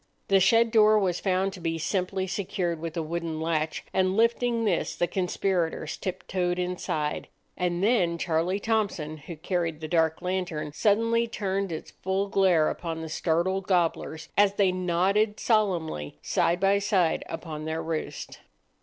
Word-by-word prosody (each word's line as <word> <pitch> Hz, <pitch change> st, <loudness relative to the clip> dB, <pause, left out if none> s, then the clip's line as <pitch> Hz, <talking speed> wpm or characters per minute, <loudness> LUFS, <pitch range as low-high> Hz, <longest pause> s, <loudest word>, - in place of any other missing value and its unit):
The 195 Hz, -1 st, +5 dB
shed 230 Hz, +4 st, +4 dB
door 215 Hz, -1 st, +6 dB
was 185 Hz, -4 st, +1 dB
found 190 Hz, 0 st, 0 dB
to 190 Hz, -, -9 dB
be 165 Hz, -1 st, -2 dB
simply 185 Hz, +3 st, -1 dB
secured 180 Hz, -3 st, -2 dB
with 165 Hz, +1 st, -5 dB
a 165 Hz, -, 0 dB
wooden 165 Hz, 0 st, -3 dB
latch, 160 Hz, -1 st, -1 dB
and 190 Hz, +1 st, +2 dB
lifting 230 Hz, 0 st, +2 dB
this 185 Hz, -5 st, 0 dB
the 175 Hz, -, +1 dB
conspirators 180 Hz, -3 st, -1 dB
tip 185 Hz, -, -5 dB
toed 180 Hz, -1 st, 0 dB
inside; 180 Hz, -4 st, -2 dB, 0.3 s
and 175 Hz, 0 st, -1 dB
then 190 Hz, -7 st, +2 dB
Charlie 170 Hz, +4 st, 0 dB
Thompson, 200 Hz, -9 st, -1 dB
who 155 Hz, +3 st, -9 dB
carried 165 Hz, -1 st, -2 dB
the 155 Hz, -, -5 dB
dark 160 Hz, -1 st, +2 dB
lantern, 180 Hz, -5 st, -2 dB
suddenly 230 Hz, +5 st, +2 dB
turned 195 Hz, -4 st, -2 dB
its 160 Hz, -, -6 dB
glare 190 Hz, -3 st, +2 dB
full -, -, +1 dB
upon 165 Hz, -2 st, -5 dB
the 160 Hz, -, -6 dB
startled 175 Hz, +4 st, 0 dB
gobblers 165 Hz, -3 st, 0 dB
as 205 Hz, -1 st, +4 dB
they 195 Hz, -2 st, +3 dB
nodded 185 Hz, +4 st, +1 dB
solemnly 175 Hz, -, 0 dB
side 170 Hz, +1 st, +1 dB
by 195 Hz, +1 st, +3 dB
side 195 Hz, -5 st, +1 dB
upon 160 Hz, -2 st, -6 dB
their 160 Hz, +1 st, -2 dB
roost. 160 Hz, -1 st, -5 dB
180 Hz, 155 wpm, -27 LUFS, 165-195 Hz, 0.3 s, door